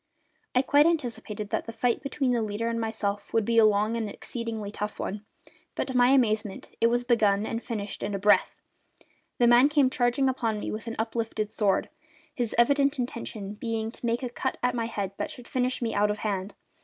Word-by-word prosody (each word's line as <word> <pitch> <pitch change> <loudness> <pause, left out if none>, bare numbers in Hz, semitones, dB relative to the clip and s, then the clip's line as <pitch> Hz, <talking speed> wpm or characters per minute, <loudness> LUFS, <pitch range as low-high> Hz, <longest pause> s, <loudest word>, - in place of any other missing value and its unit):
I 255 - +4
quite 290 +3 +5
anticipated 230 -9 -2
that - - -1
the - - -4
fight 240 +1 0
between 275 -1 -1
the 240 -2 +1
leader 215 +1 -2
and 230 0 -2
myself 210 -2 -3
would 225 -2 +3
be 230 +1 +3
a 220 - +7
long 215 +2 +2
and 225 -2 -2
exceedingly 225 -2 -5
tough 210 0 -5
one; 205 +2 -4 0.5
but, - - -1
to 260 - -4
my 245 0 +6
amazement, 220 -6 +1
it 230 - +6
was 240 +1 +1
begun 215 -4 +2
and 230 +1 -3
finished 210 -5 -5
in 205 - -2
a - - 0
breath. 205 +2 +3 0.8
The 240 - +4
man 240 +4 +6
came 290 -3 +3
charging 245 +2 +2
upon 230 -5 -1
me - - -4
with 220 +2 -5
uplifted 225 -1 -2
sword, 200 -3 +1 0.5
his 240 -5 -2
evident 280 +4 +3
intention 230 -5 -4
being 225 0 -3
to - - -14
make 235 +3 0
a 250 - -2
cut 260 +2 -3
at 250 0 +2
my 235 -1 -1
head 200 -4 -3
that - - -3
should 245 - -10
finish 255 -1 -1
me 225 - -1
out 210 +1 +2
of 210 - -1
hand. 200 -2 -3
230 Hz, 205 wpm, -27 LUFS, 210-245 Hz, 0.8 s, a